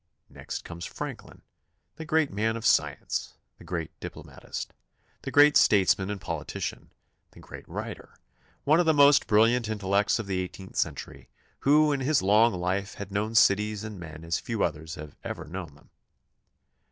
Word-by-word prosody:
Next - - -7
comes 85 0 -8
Franklin, - - -8 0.5
the 160 - -7
great 155 -1 +1
man 110 +3 0
of 115 - -7
science, - - 0 0.2
the - - -13
great 85 -3 -4
diplomatist, - - -8 0.5
the - - -5
great 145 +1 +6
statesman 95 -1 +4
and 105 -1 -4
politician, 80 -4 -5 0.4
the - - -15
great - - -12
writer; - - -7 0.5
one 155 +4 +4
of 175 - +2
the 160 - +4
most 145 0 +6
brilliant 115 +2 +3
intellects 100 -1 +1
of 110 - -4
the 95 -1 -2
eighteenth 95 +1 -7
cen - - 0
tury, 65 -2 -10 0.3
who 150 +2 +4
in 140 - 0
his 135 -3 +1
long 105 +4 +5
life 95 +3 -2
had 100 -1 -8
known 105 +3 -2
cities 105 0 +3
and 105 -3 -7
men 80 -1 -9
as 85 0 -1
few 115 -3 -2
others 80 0 -3
have 75 -1 -10
ever - - -6
known 85 -3 -7
them. 70 - -23
100 Hz, 165 wpm, -27 LUFS, 90-115 Hz, 0.5 s, great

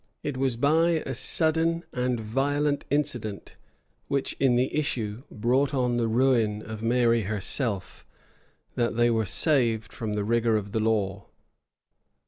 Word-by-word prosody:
It 145 - -3
was 130 -2 0
by 160 +5 +3
a 135 - -3
sudden 165 +5 +1
and 125 -1 -1
violent 140 +6 0
incident, 125 -8 -2 0.5
which, 140 -1 -1
in 130 -3 +3
the 125 +2 +1
issue, 120 -7 -1
brought 130 +6 +1
on 125 -2 +1
the 115 -1 +1
ruin 115 -3 +2
of 110 -1 -7
Mary 115 0 +3
herself, 105 0 -3 0.7
that 120 -1 0
they 120 0 +4
were 110 -2 0
saved 120 - +1
from 110 -2 -4
the 105 -1 -1
rigor 115 0 +2
of 100 -1 -5
the 110 - 0
law. 105 -2 -1
120 Hz, 140 wpm, -26 LUFS, 110-140 Hz, 0.7 s, they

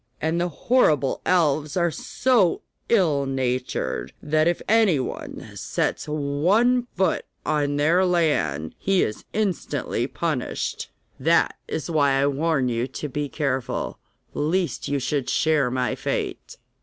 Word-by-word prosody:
And 160 +2 0
the 175 - 0
horrible 155 - +2
elves 155 -3 +2
are 170 -1 +2
so 220 - +1 0.3
ill 155 -11 +3
natured 130 - -2
that 155 +2 +1
if 175 - +1
anyone 200 - 0
sets - - -2
one 175 - +2
foot 190 -3 +1 0.2
on 145 -1 +1
their 160 +6 +3
land 145 - +1
he 195 -1 +2
is 105 - -4
instantly 160 - -1
punished. 155 -4 -3 0.3
That - - +3
is 160 - -3
why 145 -3 +3
I 135 +1 +3
warn 145 -1 +1
you 120 +1 -1
to 145 +3 -6
be 145 +2 -3
careful, 135 -4 -2 0.3
lest 165 0 -1
you 140 - 0
should 135 0 -1
share 155 -5 +2
my 125 0 0
fate. - - -4
150 Hz, 130 wpm, -24 LUFS, 135-175 Hz, 0.3 s, ill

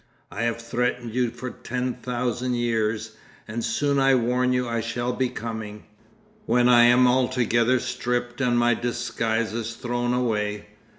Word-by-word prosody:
I 105 - -5
have 115 0 -1
threatened 120 0 -2
you 125 -1 +1
for 120 +2 -7
ten 125 +1 -3
thousand 125 0 -2
years, 110 -2 -1 0.3
and 115 +2 -4
soon 140 +2 +1
I 135 0 +5
warn 125 +1 +1
you 125 -1 0
I 115 -1 -1
shall 120 +2 -2
be 130 0 0
coming. 110 -3 -6 0.6
When 120 0 +3
I 120 -1 +7
am 125 +1 +6
altogether 125 -1 +2
stripped 120 +1 -3
and 120 -2 +2
my 120 0 +4
disguises 115 -1 -2
thrown 120 0 -1
away. 105 -4 -1
120 Hz, 150 wpm, -24 LUFS, 115-125 Hz, 0.6 s, I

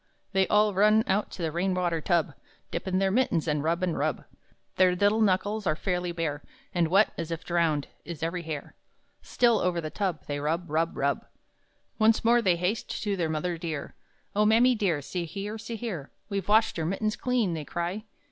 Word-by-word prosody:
Then 190 0 +3
all 210 0 +4
run 215 +3 +5
out 205 +2 0
to 175 - -5
the 160 - 0
rain 180 +3 0
water 175 -3 0
tub, 170 -3 +1 0.4
Dip - - -4
in 185 0 +1
their 195 0 +2
mittens, 195 -9 +1
and 150 -2 0
rub, 170 +3 0
and 175 -3 0
rub; 150 -2 -1 0.5
Their 185 -1 +5
little 205 +4 +3
knuckles 205 +1 +1
are 155 - +2
fairly 180 0 -2
bare, 160 -4 -3 0.3
And 175 -3 +2
wet, 195 +6 +4
as 165 -1 -3
if 165 +1 -4
drowned, 165 -4 +1 0.2
is 165 -3 -7
every 170 +2 -1
hair 155 -4 -6 0.5
Still, 235 -3 +2
over 180 -1 0
the 155 -2 -5
tub, 185 -6 -2
They 145 0 -3
rub, 165 +3 -2
rub, 165 +2 0
rub! 140 +1 0 0.7
Once 225 +1 +4
more 240 +1 +5
they 185 -5 +3
haste 180 +6 -2
to 205 -2 0
their 170 -4 -1
mother 165 +2 -2
dear; 160 -4 -4 0.4
"Oh 210 - +4
mammy 230 +4 +5
dear, 185 - 0
see 175 +4 -3
here, 205 +5 -5
see 225 +1 -6
here, 200 - -5 0.2
We've 195 -3 -3
washed 215 -3 +3
our 160 - -1
mittens 215 +4 -1
clean!" 245 -8 0
they 160 -2 -4
cry. 175 +8 -4
180 Hz, 200 wpm, -27 LUFS, 165-210 Hz, 0.7 s, run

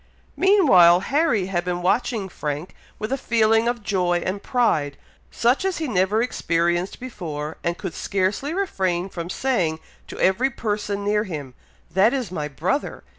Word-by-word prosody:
Meanwhile, 200 - +6
Harry 285 - +2
had 180 -2 -1
been 175 0 -3
watching 210 +1 0
Frank 150 -1 -5 0.2
with 215 +3 -5
a 270 - 0
feeling 225 -1 +2
of 240 -2 -2
joy 180 -4 0
and 195 +2 -2
pride, 155 - 0 0.3
such 245 +8 +1
as 380 -1 -1
he 320 - -2
never 205 +1 +2
experienced 175 -5 -1
before, 160 -11 -6
and 170 0 -1
could 190 -4 -5
scarcely 200 +9 -1
refrain 190 - -1
from 170 -2 -6
saying 180 -10 0 0.3
to - - -9
every 230 +8 +3
person 205 -4 -3
near 210 +1 +1
him, 145 -8 -6 0.4
"That 195 +9 +4
is 245 -9 -3
my 150 -5 -3
brother!" 175 - -2
195 Hz, 155 wpm, -23 LUFS, 175-240 Hz, 0.4 s, Meanwhile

